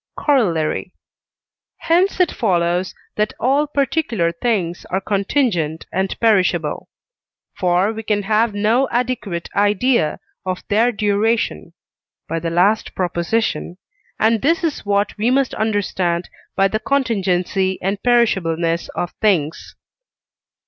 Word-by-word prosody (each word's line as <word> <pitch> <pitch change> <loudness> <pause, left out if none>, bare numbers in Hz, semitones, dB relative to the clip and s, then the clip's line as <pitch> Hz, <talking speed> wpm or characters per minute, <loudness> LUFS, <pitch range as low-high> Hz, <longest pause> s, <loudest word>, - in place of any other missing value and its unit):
Corollary. 185 - 0 0.8
Hence 360 +4 +1
it 360 -3 +3
follows 180 -3 0 0.2
that 210 0 0
all 275 +5 +2
particular 275 - 0
things 175 -2 -1
are 190 - 0
contingent 195 - 0
and 190 0 -2
perishable. 185 -8 +1 0.6
For 180 +4 +1
we 220 - -5
can 210 -1 -1
have 215 +1 +1
no 225 +6 +2
adequate 235 -8 -2
idea 205 -3 +2 0.2
of 185 -1 -4
their 225 +4 +3
duration 215 +1 0 0.5
(by 165 - -2
the 165 +1 -3
last 190 +6 +1
Prop.), 180 -2 -2
and 220 - -2
this 330 +6 +2
is 310 -10 -2
what 200 0 +1
we 225 +3 +2
must 265 0 +1
understand 190 -5 -1 0.3
by 195 - +4
the 215 +2 -2
contingency 195 -7 0
and 195 +2 -2
perishableness 170 -9 +1
of 175 - -2
things. 170 -7 0
205 Hz, 115 wpm, -19 LUFS, 180-235 Hz, 0.8 s, by